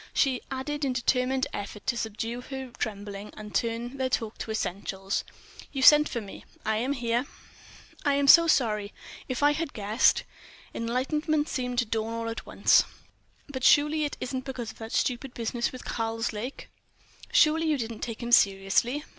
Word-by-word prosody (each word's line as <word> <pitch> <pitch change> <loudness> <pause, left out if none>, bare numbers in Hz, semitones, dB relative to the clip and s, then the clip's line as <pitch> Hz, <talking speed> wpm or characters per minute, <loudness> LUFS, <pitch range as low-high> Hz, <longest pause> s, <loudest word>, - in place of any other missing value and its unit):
She 265 -3 +2
added 290 +3 -3
in 265 -2 +1
determined 255 +2 +1
effort 205 0 -6
to 245 - +1
subdue 230 +1 -3
her 265 -1 -7
trembling 205 -2 -5
and 210 -1 -9
turn 235 +2 -2
their 260 -1 0
talk 225 -4 -2
to - - -5
essentials: 195 -2 -2 0.5
"You 270 -2 -2
sent 300 +2 +8
for 235 - -2
me—I 215 +1 -5
am 255 +5 0
here." 240 0 -1 0.8
"I 285 -2 +2
am 280 0 +1
so 335 +4 +9
sorry. 210 -8 +1 0.3
If 255 +2 -2
I 290 - +6
had 310 0 -3
guessed 215 +3 +2 0.3
..." - - -22
Enlightenment 295 +6 0
seemed 250 -4 -3
to 245 - +3
dawn 220 +1 -2
all 230 0 -3
at 230 - -6
once. - - +4 0.6
"But 260 -3 -6
surely 300 +2 +5
it 290 - -3
isn't 260 0 -3
because 255 -4 -5
of - - -19
that 225 0 -7
stupid 250 +1 -1
business 235 +1 -1
with 255 - -10
Karslake? 225 +2 -3 0.6
Surely 320 -8 +4
you 305 -2 +2
didn't 230 -3 -5
take 230 0 -5
him 235 - -4
seriously?" 200 +6 +3
245 Hz, 170 wpm, -27 LUFS, 225-275 Hz, 0.8 s, so